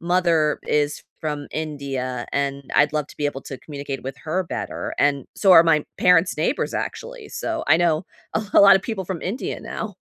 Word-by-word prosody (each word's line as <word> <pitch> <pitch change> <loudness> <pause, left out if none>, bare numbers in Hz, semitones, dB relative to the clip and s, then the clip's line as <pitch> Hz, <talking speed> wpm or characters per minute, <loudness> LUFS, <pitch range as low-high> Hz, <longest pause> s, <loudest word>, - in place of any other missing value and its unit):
mother 170 -3 +2
is 145 0 0 0.2
from 150 -2 -4
India 140 -5 -4
and 140 -1 -2
I'd 150 +1 +4
love 150 -1 0
to - - -14
be 145 - 0
able 140 -2 -4
to 135 - -8
communicate 140 -2 -6
with 135 0 -5
her 160 +4 -2
better - - -5
and 140 -2 +2
so 195 -2 +5
are 165 -1 +9
my 155 -2 +3
parents' 180 -1 +4
neighbors 165 - -1
actually. 485 -3 -5
So, 330 -1 -3
I - - +6
know 170 0 +1 0.3
a 215 - 0
a - - +8
lotta 200 -1 +8
people 200 -3 -4
from 180 -2 -4
India 205 +8 -3
now. - - -6
155 Hz, 190 wpm, -22 LUFS, 145-180 Hz, 0.3 s, are